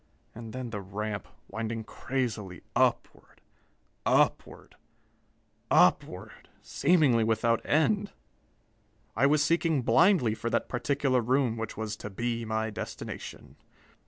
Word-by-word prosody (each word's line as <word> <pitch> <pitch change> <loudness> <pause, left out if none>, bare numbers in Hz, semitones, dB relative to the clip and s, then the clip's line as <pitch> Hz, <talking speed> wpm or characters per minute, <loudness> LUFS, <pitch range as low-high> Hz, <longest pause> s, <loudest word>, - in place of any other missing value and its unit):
And 115 -1 -9
then 125 -1 -6
the 105 -2 -4
ramp, 100 +2 -5 0.2
winding 110 +2 -4
crazily 110 -8 -4
upward - - 0 0.6
upward - - +1 1.0
upward, - - +1
seemingly 145 -8 +3
without 115 +1 +1
end. 200 +7 +1 1.0
I 140 - +4
was 150 +1 +3
seeking 165 -3 +1
blindly 160 - +4
for 115 +1 -4
that - - 0
particular 135 0 0
room 125 0 +1
which 115 0 -5
was 110 -1 -3
to 105 - -7
be 115 +3 -3
my 110 0 -2
destination. - - -8
115 Hz, 110 wpm, -28 LUFS, 110-140 Hz, 1.0 s, I